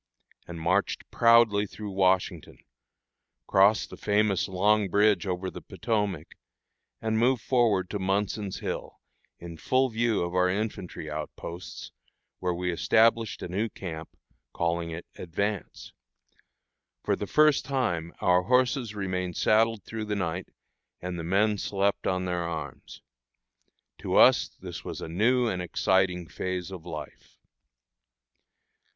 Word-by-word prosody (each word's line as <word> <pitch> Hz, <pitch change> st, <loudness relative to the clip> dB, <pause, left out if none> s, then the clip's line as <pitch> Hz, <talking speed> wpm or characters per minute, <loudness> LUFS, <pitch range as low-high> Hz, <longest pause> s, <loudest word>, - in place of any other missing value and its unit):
and 85 Hz, -1 st, -7 dB
marched 95 Hz, +5 st, 0 dB
proudly 115 Hz, -3 st, +5 dB
through 105 Hz, +1 st, -7 dB
Washington, 95 Hz, -3 st, +1 dB, 0.9 s
crossed 100 Hz, -, +3 dB
the -, -, -9 dB
famous 105 Hz, -2 st, +1 dB
Long 100 Hz, +2 st, +2 dB
Bridge 105 Hz, 0 st, +3 dB
over 90 Hz, 0 st, -2 dB
the -, -, -9 dB
Potomac, 105 Hz, -8 st, -2 dB, 0.7 s
and 110 Hz, 0 st, 0 dB
moved 120 Hz, 0 st, +2 dB
forward 110 Hz, -8 st, +2 dB
to 105 Hz, -, -2 dB
Munson's 100 Hz, +1 st, -1 dB
Hill, -, -, -5 dB, 0.4 s
in 85 Hz, -1 st, -9 dB
full 130 Hz, +9 st, +2 dB
view 115 Hz, -3 st, +1 dB
of 85 Hz, 0 st, -4 dB
our 90 Hz, 0 st, +3 dB
infantry 100 Hz, -5 st, -4 dB
outposts, 75 Hz, +3 st, -7 dB, 0.5 s
where 90 Hz, -1 st, -1 dB
we 90 Hz, +1 st, -1 dB
established 115 Hz, +5 st, +2 dB
a -, -, -3 dB
new 100 Hz, +6 st, -1 dB
camp, 80 Hz, -5 st, -7 dB, 0.4 s
calling 85 Hz, 0 st, -1 dB
it 85 Hz, +1 st, -7 dB
"Advance." 100 Hz, +4 st, -4 dB, 1.1 s
For -, -, +1 dB
the -, -, -5 dB
first 155 Hz, -2 st, +4 dB
time 85 Hz, -12 st, -1 dB
our 90 Hz, 0 st, +4 dB
horses 125 Hz, +1 st, +1 dB
remained 90 Hz, -3 st, -3 dB
saddled 110 Hz, -1 st, +3 dB
through 110 Hz, -1 st, -5 dB
the 105 Hz, -1 st, -2 dB
night, 90 Hz, -2 st, -3 dB, 0.5 s
and 90 Hz, -1 st, -5 dB
the -, -, -4 dB
men 100 Hz, +4 st, +2 dB
slept 100 Hz, 0 st, 0 dB
on 90 Hz, 0 st, 0 dB
their 90 Hz, -1 st, -1 dB
arms. 80 Hz, -5 st, -6 dB, 1.0 s
To -, -, -2 dB
us -, -, +6 dB
this -, -, -9 dB
was -, -, -6 dB
a -, -, -6 dB
new 120 Hz, +9 st, +2 dB
and 90 Hz, -5 st, -2 dB
exciting 90 Hz, 0 st, +1 dB
phase 90 Hz, +1 st, -4 dB
of 90 Hz, -2 st, -9 dB
life. 75 Hz, -3 st, -9 dB
95 Hz, 135 wpm, -27 LUFS, 90-110 Hz, 1.1 s, us